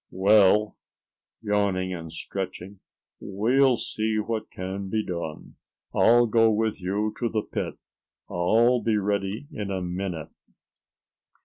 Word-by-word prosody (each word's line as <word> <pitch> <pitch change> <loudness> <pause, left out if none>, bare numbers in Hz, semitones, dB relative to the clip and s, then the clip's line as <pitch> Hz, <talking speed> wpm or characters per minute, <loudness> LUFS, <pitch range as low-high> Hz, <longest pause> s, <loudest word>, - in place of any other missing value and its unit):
Well," 105 +2 +4 0.6
yawning 100 -3 0
and 80 -2 -7
stretching, 95 +3 -6 0.4
"we'll 125 +6 +2
see 110 0 -2
what 110 +1 -2
can 95 +1 -5
be 110 +1 -1
done. 85 -4 -6 0.4
I'll 120 +1 +5
go 115 0 +4
with 110 -2 0
you 105 +4 -1
to 120 - 0
the 110 -2 -1
pit. - - -4 0.5
I'll 115 +8 +3
be 110 -2 +1
ready 100 +3 -1
in 105 -2 -5
a 95 -1 -2
minute." 90 -3 -4
105 Hz, 120 wpm, -26 LUFS, 95-110 Hz, 0.6 s, I'll